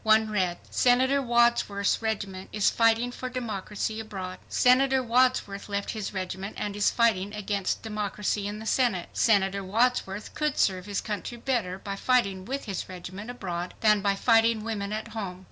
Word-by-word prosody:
One 220 0 +4
read: 185 -4 0
SENATOR 260 +3 +3
WADSWORTH's 235 -5 +2
REGIMENT 200 -4 -3
IS 210 -1 +2
FIGHTING 230 +1 +3
FOR 255 +1 -5
DEMOCRACY 220 -3 -3
ABROAD. 190 -4 -6
SENATOR 260 +1 +4
WADSWORTH 240 -5 +1
LEFT 200 0 -2
HIS 215 -3 -4
REGIMENT 190 +1 -5
AND 205 -1 -3
IS 205 - +3
FIGHTING 210 -3 +1
AGAINST 200 -2 -2
DEMOCRACY 210 -1 -2
IN 205 +1 -4
THE 220 - -8
SENATE. 220 -7 +1
SENATOR 200 -3 +2
WADSWORTH 210 -1 0
COULD 300 -1 -1
SERVE 185 -2 +1
HIS 205 - -2
COUNTRY 210 +3 -5
BETTER 230 -7 -1
BY 195 0 -5
FIGHTING 195 -5 +1
WITH 270 +5 -4
HIS 195 -4 -4
REGIMENT 185 +4 -8
ABROAD 180 -7 -5
THAN 210 -2 +4
BY 200 0 +1
FIGHTING 225 0 +3
WOMEN 210 -3 -3
AT 220 +2 -4
HOME. 200 -5 -5
210 Hz, 160 wpm, -27 LUFS, 195-235 Hz, -, One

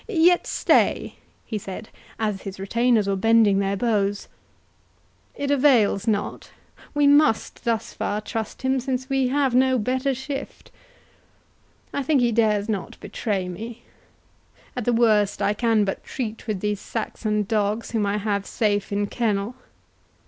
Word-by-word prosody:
—yet 355 -4 +3
stay," - - +2 0.3
he 215 - -3
said, 195 +3 -8 0.3
as 210 -3 -2
his 195 -1 -8
retainers 230 +2 +2
were 195 - +1
bending 215 -1 +4
their 200 0 0
bows, 205 -3 0 1.1
"it 285 0 -2
avails 245 -7 +3
not—we 225 +6 -3
must 285 -5 +3
thus 230 -1 -1
far 205 +1 -2
trust 220 +3 -5
him 260 0 +2
since 260 +1 -3
we 270 -1 +2
have 270 -1 +1
no 260 +1 +4
better 260 +4 0
shift. 270 +2 -7 1.2
I 280 - -1
think 280 +1 +2
he 240 -1 +2
dares 215 -2 +2
not 205 -5 -4
betray 195 -5 -3
me—at 230 +3 -11
the 245 - +2
worst 220 -4 +3
I 205 - +1
can 220 -1 +2
but 195 - -4
treat 230 -3 -5
with 205 -4 -2
these 210 -1 -1
Saxon 215 -1 -2
dogs 210 +2 -1
whom 220 -3 0
I 200 +1 0
have 200 -1 -2
safe 205 -2 0
in 205 0 0
kennel. 210 0 -1
220 Hz, 140 wpm, -24 LUFS, 205-255 Hz, 1.2 s, bending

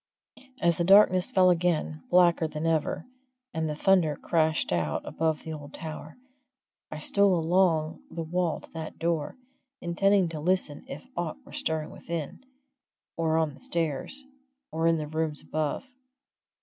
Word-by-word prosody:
As 170 -1 +2
the - - +3
darkness 190 +1 +6
fell 185 -7 +5
again, 165 - 0
blacker 175 -2 +4
than 155 +1 -5
ever, 160 -2 0 0.5
and 160 -1 -1
the 150 - -2
thunder 170 -3 +3
crashed 160 - +1
out 80 -4 -1
above 160 -1 -1
the 160 - -5
old 145 -2 -9
tower, 155 +1 -8 0.7
I 155 - -6
stole 200 +5 +3
along 165 -2 +2
the 165 - -4
wall 170 0 -1
to - - -16
that 160 -1 -7
door, 165 - -1 0.4
intending 190 +2 +2
to 160 -2 -5
listen 175 - -1
if 275 - -8
aught 170 -3 -3
were - - -14
stirring 155 -1 -2
within, 165 - -6 0.7
or 160 -1 +1
on 160 -3 +1
the - - -15
stairs, 170 - -2 0.5
or 160 +1 +1
in 165 0 +4
the 155 - -3
rooms 155 0 -3
above. 155 - -2
165 Hz, 150 wpm, -28 LUFS, 155-175 Hz, 0.7 s, darkness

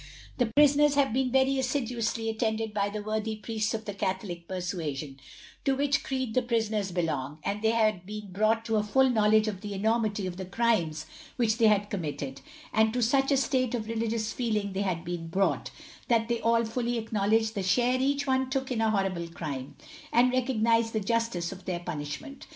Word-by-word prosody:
The 245 - +3
prisoners 290 +3 +4
have 275 -5 +2
been 260 0 +1
very 265 +1 +3
assiduously 240 -4 -1
attended 220 -1 -1
by 200 -1 0
the 210 0 -5
worthy 215 +1 -2
Priests 215 0 -2
of 220 0 -6
the 205 - -4
Catholic 185 -3 -3
persuasion, 160 -7 -4 0.4
to 275 - +2
which 285 +1 +1
creed 260 -4 -2
the 255 - +3
prisoners 220 -5 -1
belong, 150 -5 -2
and 200 +1 -2
they 220 - +3
had 215 -5 +2
been 210 0 -7
brought 215 +4 +1
to 225 -1 +1
a 210 - +2
full 265 +5 +3
knowledge 215 -1 +4
of 195 -3 -3
the 205 -1 -5
enormity 215 -1 0
of 180 -1 -5
the 190 - -5
crimes 185 -7 0 0.3
which 230 -1 +1
they 225 - +6
had 205 -1 +2
committed; 145 -7 -4 0.3
and 220 0 +3
to 245 -1 +1
such 270 +4 +2
a 275 - +4
state 255 -2 +1
of 220 -2 -4
religious 225 -1 -1
feeling 215 -5 -1
had 190 -3 0
they 175 +1 -2
been 165 -1 -8
brought, 190 +4 0 0.4
that 230 -1 +2
they 235 -1 0
all 230 0 +3
fully 235 +1 -1
acknowledged 220 0 +1
the 200 - -2
share 245 +7 +2
each 280 +1 +1
one 260 -1 +1
took 265 -1 -2
in 240 - -1
the 225 0 +2
horrible 195 -5 0
crime, 145 -6 -6 0.4
and 245 +1 +4
recognized 230 -3 +2
the 220 - +1
justice 215 -5 -1
of 190 0 -10
their 180 -2 -2
punishment. 175 - -6
220 Hz, 195 wpm, -28 LUFS, 195-240 Hz, 0.4 s, they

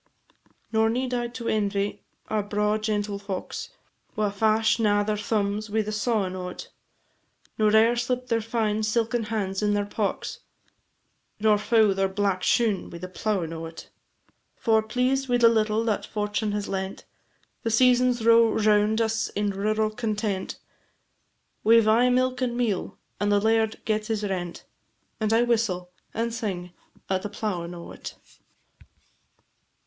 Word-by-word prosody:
Nor 220 0 +3
need 250 +2 -1
I 240 -1 0
to 235 0 -7
envy 200 -1 0 0.3
our 215 -1 0
braw 210 +1 0
gentle 210 -1 -2
focks, 200 -2 -5 0.5
Wha 210 -1 0
fash 220 +2 +2
na 205 -2 +3
their 210 0 -1
thumbs 210 0 -1
wi' 220 +1 +1
the 210 - -4
sawing 210 -3 0
o't, 180 -1 -6 0.9
Nor 215 0 +4
e'er 225 +2 +5
slip 250 +1 -1
their 230 -2 0
fine 220 -1 -1
silken 225 +1 0
hands 200 -3 -2
in 205 0 +2
the 205 0 0
pocks, 205 0 -3 1.0
Nor 210 -1 +4
foul 220 -2 +4
their 195 0 +1
black 195 -1 0
shoon 215 -4 +1
wi' 170 - -8
the 185 +2 -6
plowin' 185 -3 -2
o't: 165 0 -8 0.6
For, 220 -2 +2
pleased 255 +4 0
wi' 245 - +3
the 235 -1 +6
little 220 -1 +2
that 220 -3 -1
fortune 210 0 -2
has 205 -1 -2
lent, 190 0 -4 0.6
The 230 - -1
seasons 245 0 +3
row 230 -1 +6
round 215 0 +3
us 225 0 0
in 205 0 -1
rural 215 +2 0
content; 215 -4 -2 1.1
We 230 +1 +7
've 220 - +1
aye 235 +3 +5
milk 255 0 +1
and 240 -2 -1
meal, 220 -7 -1 0.2
and 205 +1 +1
our 205 - +4
laird 220 +1 +1
gets 215 -1 0
his 220 -2 -1
rent, 180 -4 -4 0.5
And 215 -1 0
I 225 +2 +4
whistle 215 -7 0 0.2
and 230 +1 -2
sing 190 -6 -4 0.4
at 190 -1 0
the 210 - -5
plowin' 180 -5 -4
o't. 170 - -9
215 Hz, 150 wpm, -26 LUFS, 205-230 Hz, 1.1 s, We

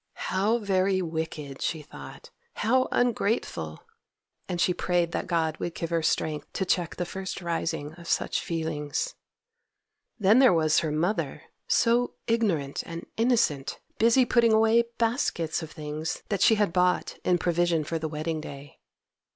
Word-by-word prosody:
How 205 +5 +2
very 195 -3 +1
wicked! 160 -5 -4
she 160 -3 -2
thought; 485 - -11 0.2
how 255 +4 +2
ungrateful! 210 - -1 0.7
and 175 -1 -2
she 180 - +3
prayed 175 -1 0
that - - -3
God 160 -3 0
would 170 - -4
give 165 0 -4
her 165 -1 +1
strength 155 -1 -1
to 190 - -1
check 175 -3 0
the 175 - -2
first 190 +2 -5
rising 165 -4 -3
of 170 - -11
such - - 0
feelings. 160 - -3 1.0
Then 210 +2 +5
there 260 -6 +7
was 155 -1 +3
her 155 - -2
mother, 170 +8 -1 0.2
so 240 +1 +2
ignorant 195 - 0
and 170 0 -7
innocent, 220 - +1 0.2
busy 235 +3 +5
putting 235 -2 +4
away 225 +2 +4
baskets 225 - 0
of 160 - -7
things 155 +1 -5
that 200 -3 -1
she 220 - +6
had 205 -5 +1
bought 180 0 +1
in 180 - +3
provision 175 -2 +1
for 165 +2 -3
the 160 0 -3
wedding 155 +1 -3
day. 140 -1 -10
175 Hz, 150 wpm, -27 LUFS, 160-220 Hz, 1.0 s, there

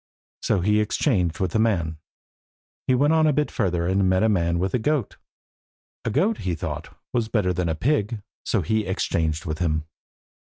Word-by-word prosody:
So 100 - +1
he 105 +3 +3
exchanged 105 - +1
with 95 -3 0
the 110 - +1
man. 85 -8 +1 0.9
He 130 - +4
went 145 +5 +3
on 160 -1 +4
a 150 - +3
bit 150 +2 0
further, 90 -6 0
and 95 +1 +2
met 95 +2 +3
a 110 - +4
man 85 -4 +1
with 95 +2 -1
a 125 - +2
goat. 140 -1 -1 0.9
A - - +1
goat, 205 - +1
he 90 -2 -2
thought, - - -6 0.2
was 120 -3 +1
better 105 -5 +1
than 90 -1 -1
a 80 - 0
pig. 110 - 0 0.2
So - - 0
he 110 -2 0
exchanged 80 -3 -1
with 80 -1 -3
him. 80 -3 0
100 Hz, 190 wpm, -24 LUFS, 85-115 Hz, 0.9 s, He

